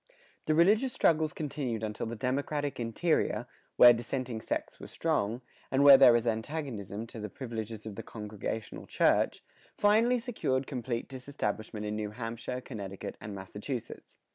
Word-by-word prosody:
[112:2] -, -, -31 dB, 0.3 s
The 155 Hz, -, +2 dB
religious 210 Hz, +10 st, +4 dB
struggles 155 Hz, -1 st, +3 dB
continued 135 Hz, -7 st, -3 dB
until 105 Hz, +1 st, -3 dB
the 115 Hz, -, -4 dB
democratic 140 Hz, +4 st, -2 dB
interior, 120 Hz, -1 st, 0 dB, 0.3 s
where 120 Hz, 0 st, +9 dB
dissenting 120 Hz, 0 st, -3 dB
sects -, -, -4 dB
were -, -, -9 dB
strong, 110 Hz, +5 st, -1 dB, 0.3 s
and 135 Hz, +1 st, +2 dB
where 140 Hz, -1 st, +11 dB
there 135 Hz, -2 st, +8 dB
was 120 Hz, 0 st, +2 dB
antagonism 110 Hz, -, -3 dB
to 115 Hz, 0 st, -10 dB
the 105 Hz, 0 st, -5 dB
privileges 110 Hz, -3 st, -6 dB
of 110 Hz, -, -6 dB
the -, -, -6 dB
congregational 105 Hz, 0 st, -6 dB
church, -, -, +2 dB, 0.3 s
finally 225 Hz, +4 st, +4 dB
secured 220 Hz, -, -1 dB
complete 120 Hz, -3 st, -3 dB
disestablishment 125 Hz, -5 st, -4 dB
in 105 Hz, 0 st, -2 dB
New 105 Hz, -1 st, -3 dB
Hampshire, 115 Hz, +3 st, -5 dB
Connecticut, 100 Hz, -7 st, -7 dB
and 105 Hz, -1 st, -6 dB
Massachusetts. 105 Hz, +6 st, -7 dB
120 Hz, 150 wpm, -30 LUFS, 110-140 Hz, 0.3 s, where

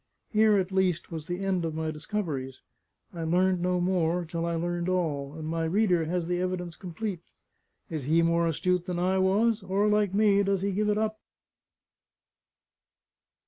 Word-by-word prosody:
Here 215 Hz, -1 st, +4 dB
at 190 Hz, -1 st, -1 dB
least 185 Hz, -3 st, 0 dB
was 160 Hz, -2 st, -6 dB
the 180 Hz, +2 st, -3 dB
end 185 Hz, -3 st, 0 dB
of 160 Hz, -1 st, -3 dB
my 160 Hz, 0 st, -2 dB
discoveries; 150 Hz, -6 st, -4 dB, 0.5 s
I 170 Hz, -2 st, -5 dB
learned 180 Hz, +2 st, +2 dB
no 180 Hz, 0 st, +1 dB
more, 175 Hz, -1 st, +1 dB
till 165 Hz, +1 st, -3 dB
I 170 Hz, -, -1 dB
learned 175 Hz, +1 st, -2 dB
all; 150 Hz, -6 st, -1 dB
and 160 Hz, -1 st, -6 dB
my 165 Hz, 0 st, -1 dB
reader 180 Hz, -1 st, +2 dB
has 175 Hz, +1 st, -1 dB
the 175 Hz, +1 st, -1 dB
evidence 180 Hz, -2 st, -3 dB
complete. 185 Hz, +1 st, -5 dB, 0.7 s
Is 155 Hz, -5 st, -5 dB
he 165 Hz, +3 st, +3 dB
more 170 Hz, 0 st, +2 dB
astute 180 Hz, +3 st, 0 dB
than 180 Hz, -1 st, -2 dB
I 185 Hz, +2 st, +1 dB
was? 210 Hz, +4 st, +2 dB
or, 195 Hz, +2 st, +1 dB
like 210 Hz, -2 st, +2 dB
me, 205 Hz, -1 st, +4 dB
does 195 Hz, -1 st, 0 dB
he 200 Hz, -, 0 dB
give 210 Hz, +2 st, 0 dB
it 210 Hz, -, +2 dB
up? 215 Hz, 0 st, -1 dB
180 Hz, 175 wpm, -28 LUFS, 165-195 Hz, 0.7 s, Here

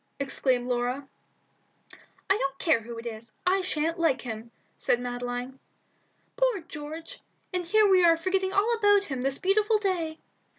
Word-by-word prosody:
exclaimed 260 Hz, -2 st, +1 dB
Laura. 250 Hz, +3 st, -1 dB, 1.2 s
"I 385 Hz, -, +4 dB
don't 275 Hz, -7 st, -2 dB
care 320 Hz, -8 st, +2 dB
who 230 Hz, +1 st, -8 dB
it 230 Hz, -, -8 dB
is. 230 Hz, 0 st, -8 dB
I 380 Hz, +2 st, +3 dB
sha'n't 330 Hz, -1 st, -1 dB
like 315 Hz, -6 st, +2 dB
him," 225 Hz, -1 st, -6 dB, 0.3 s
said 240 Hz, -, +1 dB
Madeline. 245 Hz, +1 st, -4 dB, 0.8 s
"Poor -, -, +2 dB
George! 320 Hz, -1 st, -8 dB, 0.3 s
and 360 Hz, -1 st, -1 dB
here 430 Hz, +5 st, +4 dB
we 375 Hz, -2 st, +5 dB
are 335 Hz, -1 st, +6 dB
forgetting 375 Hz, +2 st, 0 dB
all 415 Hz, +5 st, +2 dB
about 410 Hz, -1 st, +5 dB
him 270 Hz, -9 st, -4 dB
this 270 Hz, +1 st, 0 dB
beautiful 420 Hz, +3 st, +3 dB
day!" 350 Hz, -6 st, -1 dB
320 Hz, 155 wpm, -27 LUFS, 250-380 Hz, 1.2 s, are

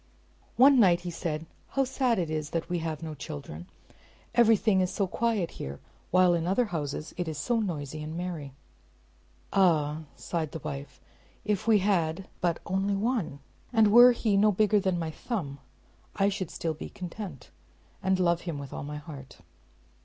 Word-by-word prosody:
One 270 Hz, +1 st, +7 dB
night 180 Hz, -6 st, +5 dB
he 175 Hz, 0 st, -5 dB
said, 160 Hz, -2 st, -3 dB, 0.2 s
"How 275 Hz, -, +1 dB
sad 255 Hz, -2 st, +1 dB
it 170 Hz, -4 st, -1 dB
is 155 Hz, -1 st, -2 dB
that 165 Hz, 0 st, -3 dB
we 175 Hz, -1 st, 0 dB
have 160 Hz, -1 st, -4 dB
no 160 Hz, -1 st, -5 dB
children; 140 Hz, -, -8 dB, 0.7 s
everything 220 Hz, -4 st, +4 dB
is 185 Hz, -, 0 dB
so 200 Hz, -, 0 dB
quiet 215 Hz, -2 st, 0 dB
here, 70 Hz, +1 st, -6 dB, 0.3 s
while 185 Hz, 0 st, +5 dB
in 170 Hz, 0 st, 0 dB
other 200 Hz, +7 st, +2 dB
houses 150 Hz, 0 st, -3 dB
it 175 Hz, -1 st, -2 dB
is 155 Hz, -2 st, -4 dB
so 240 Hz, +6 st, 0 dB
noisy 155 Hz, -7 st, -3 dB
and 155 Hz, +2 st, -5 dB
merry." 170 Hz, -6 st, -5 dB, 1.0 s
"Ah!" 160 Hz, -5 st, +2 dB
sighed 160 Hz, -4 st, -3 dB
his 160 Hz, -, -6 dB
wife, 140 Hz, -3 st, -6 dB, 0.5 s
"if 210 Hz, 0 st, -1 dB
we 220 Hz, -2 st, +6 dB
had 185 Hz, -3 st, 0 dB
but 170 Hz, -2 st, 0 dB
only 195 Hz, +2 st, 0 dB
one, 200 Hz, -, -1 dB, 0.3 s
and 220 Hz, -3 st, +4 dB
were 240 Hz, +3 st, +9 dB
he 220 Hz, -4 st, +1 dB
no 210 Hz, +1 st, +5 dB
bigger 210 Hz, +1 st, +3 dB
than 190 Hz, -2 st, 0 dB
my 165 Hz, -2 st, -3 dB
thumb, 155 Hz, -, -4 dB, 0.6 s
I 195 Hz, 0 st, +3 dB
should 190 Hz, -4 st, -3 dB
still 165 Hz, -2 st, -3 dB
be 155 Hz, -, -8 dB
content, 180 Hz, -, -8 dB, 0.5 s
and 190 Hz, 0 st, +1 dB
love 170 Hz, -1 st, +2 dB
him 170 Hz, -4 st, -4 dB
with 140 Hz, -2 st, -8 dB
all -, -, -5 dB
my 150 Hz, +1 st, -5 dB
heart." 145 Hz, -3 st, -10 dB
175 Hz, 175 wpm, -28 LUFS, 155-205 Hz, 1.0 s, were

